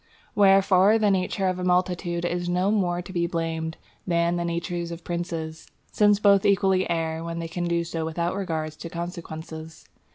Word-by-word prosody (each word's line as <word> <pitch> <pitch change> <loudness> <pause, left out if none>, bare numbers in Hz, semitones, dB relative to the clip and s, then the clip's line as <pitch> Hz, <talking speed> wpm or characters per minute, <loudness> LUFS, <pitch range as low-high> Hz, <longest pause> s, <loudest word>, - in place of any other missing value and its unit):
Wherefore 195 +1 +5
the 210 -2 +3
nature 190 0 0
of 185 0 -1
a - - -3
multitude 180 -1 0
is 175 0 -2
no 180 +3 +1
more 180 -4 0
to 185 - -10
be 170 -1 +1
blamed 165 -1 -3 0.3
than 170 0 +2
the 175 - -1
nature 170 +1 -2
of 170 0 -7
princes, 165 -2 -4 0.2
since 205 -1 +4
both 200 -2 +5
equally 190 -2 +2
err 165 -1 -1
when 170 0 -5
they 165 0 -3
can 175 +1 -3
do 170 0 0
so 165 -1 -4
without 170 +2 -2
regard 160 -5 -3
to 160 +2 -9
consequences. 165 -2 -7
175 Hz, 175 wpm, -25 LUFS, 165-185 Hz, 0.3 s, Wherefore